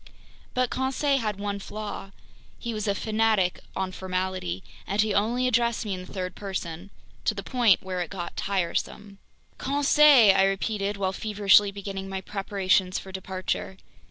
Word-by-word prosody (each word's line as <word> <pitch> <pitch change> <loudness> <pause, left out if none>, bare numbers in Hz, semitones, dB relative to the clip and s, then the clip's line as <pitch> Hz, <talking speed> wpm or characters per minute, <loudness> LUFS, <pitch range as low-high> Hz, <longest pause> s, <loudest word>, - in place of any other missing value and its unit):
But 250 -1 +1
Conseil 270 +2 +1
had 215 -4 -2
one 200 0 -3
flaw. 210 -1 -6 0.5
He 235 -1 -4
was 215 0 -3
a 200 - +1
fanatic 215 -4 +1 0.2
on 190 -1 -2
formality, 185 - -3 0.2
and 200 - -2
he 215 -1 +3
only 235 +5 +1
addressed 235 -1 +1
me 205 - -2
in 185 -1 -5
the - - -14
third 185 -2 -4
person—to 190 +2 -5
the 195 - -5
point 235 -3 +3
where 185 -1 -3
it 175 - -3
got 180 -2 -6
tiresome. 200 +2 -2 0.4
"Conseil!" 280 -5 +6
I 195 - +4
repeated, 200 +1 -1
while 190 -1 -1
feverishly 205 -1 +4
beginning 195 -1 -6
my 190 0 -3
preparations 190 -2 0
for 190 - -8
departure. 190 0 -4
200 Hz, 155 wpm, -26 LUFS, 190-220 Hz, 0.5 s, Conseil